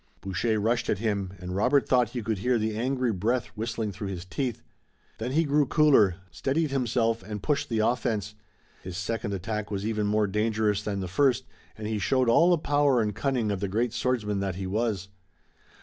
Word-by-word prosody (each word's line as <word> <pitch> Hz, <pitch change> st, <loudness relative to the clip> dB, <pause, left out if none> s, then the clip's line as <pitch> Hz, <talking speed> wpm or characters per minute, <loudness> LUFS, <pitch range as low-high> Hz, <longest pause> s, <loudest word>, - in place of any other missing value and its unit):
Boucher 100 Hz, +4 st, -1 dB
rushed 115 Hz, +3 st, 0 dB
at -, -, +2 dB
him, 100 Hz, -3 st, -2 dB
and 90 Hz, 0 st, -6 dB
Robert 130 Hz, +8 st, +3 dB
thought 125 Hz, -3 st, +3 dB
he 120 Hz, -1 st, -4 dB
could 105 Hz, -2 st, -1 dB
hear 125 Hz, +4 st, +2 dB
the 110 Hz, -1 st, -1 dB
angry 125 Hz, 0 st, 0 dB
breath 115 Hz, +6 st, -1 dB
whistling 110 Hz, -1 st, -3 dB
through 100 Hz, +1 st, -6 dB
his 90 Hz, -2 st, -5 dB
teeth. 120 Hz, +4 st, -3 dB, 0.6 s
Then 120 Hz, +4 st, -3 dB
he 160 Hz, +3 st, +3 dB
grew 145 Hz, -1 st, +2 dB
cooler, 135 Hz, -, +5 dB, 0.2 s
steadied 135 Hz, -, -1 dB
himself 115 Hz, -3 st, +1 dB
and 105 Hz, +1 st, -7 dB
pushed 145 Hz, 0 st, 0 dB
the 110 Hz, -2 st, +1 dB
offense. 110 Hz, -4 st, -1 dB, 0.5 s
His 90 Hz, -1 st, -7 dB
second 100 Hz, +2 st, -2 dB
attack 105 Hz, +2 st, -3 dB
was 100 Hz, -1 st, -3 dB
even 105 Hz, -2 st, 0 dB
more 105 Hz, 0 st, +2 dB
dangerous 105 Hz, 0 st, 0 dB
than 100 Hz, -2 st, -3 dB
the 95 Hz, -, -3 dB
first, 130 Hz, +7 st, +2 dB, 0.3 s
and 110 Hz, -, -6 dB
he 110 Hz, 0 st, -1 dB
showed 125 Hz, +5 st, +2 dB
all 165 Hz, +9 st, +5 dB
the 175 Hz, -, +5 dB
power 145 Hz, -4 st, +2 dB
and 105 Hz, -2 st, 0 dB
cunning 125 Hz, -4 st, 0 dB
of 100 Hz, -, -2 dB
the 100 Hz, -, -1 dB
great 115 Hz, +4 st, 0 dB
swordsman 120 Hz, -5 st, 0 dB
that 95 Hz, -2 st, -2 dB
he 95 Hz, +1 st, -4 dB
was. 100 Hz, -1 st, -1 dB
110 Hz, 195 wpm, -27 LUFS, 100-125 Hz, 0.6 s, cooler